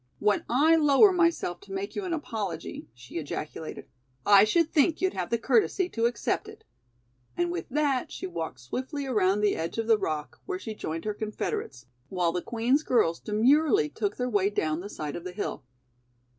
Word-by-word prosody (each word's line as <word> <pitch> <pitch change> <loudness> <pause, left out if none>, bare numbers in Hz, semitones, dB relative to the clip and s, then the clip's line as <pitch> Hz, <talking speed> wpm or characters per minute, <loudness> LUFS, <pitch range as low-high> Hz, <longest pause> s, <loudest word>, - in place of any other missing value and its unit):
"When 210 0 +1
I 310 +7 +5
lower 300 +6 +6
myself 335 - +1
to 195 - -15
make 195 +1 -4
you 405 - -3
an 360 - -3
apology," 210 - -4
she 125 +7 -7
ejaculated, 155 +1 -6 0.4
"I 200 0 +7
should 330 +8 +2
think 315 +2 +3
you'd 375 0 +1
have 180 -2 -3
the 235 - +1
courtesy 370 - +2
to 230 -5 +1
accept 245 - -2
it," 435 +1 -12 0.7
and 175 0 +1
with 170 -2 -5
that 280 -2 0
she - - -6
walked 165 -8 -5
swiftly 265 - -4
around 210 -5 +2
the 210 -1 +2
edge 165 +5 -4
of 225 - -1
the 225 -1 +4
rock, 150 -4 -4
where 380 -1 -2
she 225 - -6
joined 165 -4 -5
her 210 - -1
confederates, 205 - -4 0.2
while 180 -3 +1
the 180 +1 -2
Queen's 240 - +1
girls 220 - +2
demurely 240 - +3
took 205 +5 -3
their 250 - -1
way 205 -4 +2
down 155 -6 -1
the 200 +3 -7
side 150 -7 -5
of 170 - -6
the 180 0 -6
hill. 205 - -4
215 Hz, 190 wpm, -27 LUFS, 175-280 Hz, 0.7 s, I